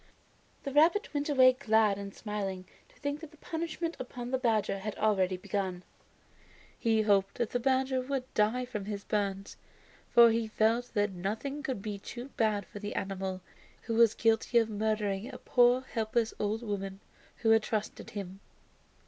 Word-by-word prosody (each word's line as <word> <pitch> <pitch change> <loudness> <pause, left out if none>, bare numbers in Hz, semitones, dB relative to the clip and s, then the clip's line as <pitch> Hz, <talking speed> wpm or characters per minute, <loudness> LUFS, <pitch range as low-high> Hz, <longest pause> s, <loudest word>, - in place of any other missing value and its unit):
The 275 - -4
rabbit 335 +8 +4
went 290 0 -1
away 255 -3 +6
glad 220 -5 +2
and 200 0 -6
smiling 195 -3 -4 0.2
to - - -24
think 285 0 -3
that 320 -1 -9
the 310 - -19
punishment 330 +1 -4
upon 245 -1 -6
the 260 - +1
badger 220 -5 +1
had 210 +2 -5
already 190 -3 +2
begun. 185 -1 -3 1.0
He 225 -2 +2
hoped 200 -2 +2
that 235 -2 -2
the 245 - 0
badger 260 +1 +1
would 265 0 -2
die 220 +4 +2
of 205 -2 -4
his 205 -1 -4
burns, 200 -2 -2 0.5
for 235 -1 +7
he 225 0 0
felt 225 +3 +1
that 205 -1 +2
nothing 215 +11 -4
could 260 -9 -4
be 205 -2 -4
too 245 +6 -8
bad 215 -5 0
for 205 - -10
the 205 0 -5
animal, 190 -1 -3 0.4
who 230 - -3
was 230 -1 +5
guilty 225 +1 +2
of 225 -1 +3
murdering 215 +1 -1
a 250 - -8
poor 245 0 +4
helpless 225 -2 -1
old 215 +3 -1
woman 195 -3 -4 0.4
who 225 -2 +2
had 225 0 +6
trusted 215 -1 -3
him. 195 -2 -7
220 Hz, 170 wpm, -30 LUFS, 200-250 Hz, 1.0 s, for